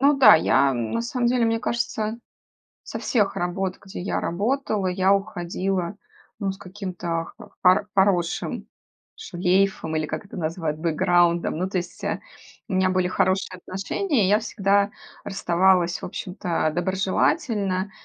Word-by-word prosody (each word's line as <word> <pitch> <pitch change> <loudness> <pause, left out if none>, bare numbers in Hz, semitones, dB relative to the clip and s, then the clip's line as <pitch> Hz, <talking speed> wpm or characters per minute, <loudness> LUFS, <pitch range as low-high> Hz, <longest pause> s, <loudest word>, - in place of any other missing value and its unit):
Ну 280 +1 +5
да, 265 - +9
я 140 -3 +3
на 120 - -2
самом 240 0 -1
деле, 245 -1 +2
мне 225 0 +1
кажется, 225 -2 -2 0.6
со - - -6
всех 210 -5 +1
работ, 180 +1 -2
где 190 - -7
я 180 - -2
работала, 215 +2 -1
я 185 +1 +2
уходила, 190 -1 -2 0.4
ну, 200 -3 -1
с 190 - -12
каким-то 180 -4 -4
хо - - -13
поро 185 +2 +5
поросшим 190 -3 +1 0.5
шлейфом 180 -2 0
или, 155 -1 -1
как 175 - -5
это - - -11
называют, 160 -2 -2
бэкграундом. 170 +1 +2
Ну, 185 +2 -1
то 190 - -1
есть, 175 0 -6
э, - - -2 0.5
у - - -6
меня 185 0 +3
были 185 -1 +1
хорошие 185 0 0
отношения, 200 - -1
я 205 +2 +5
всегда 200 -2 +1 0.3
расставалась, 180 -1 +2
в - - -4
общем-то, 180 -3 -2
доброжелательно. 190 - 0
190 Hz, 145 wpm, -24 LUFS, 175-205 Hz, 0.6 s, да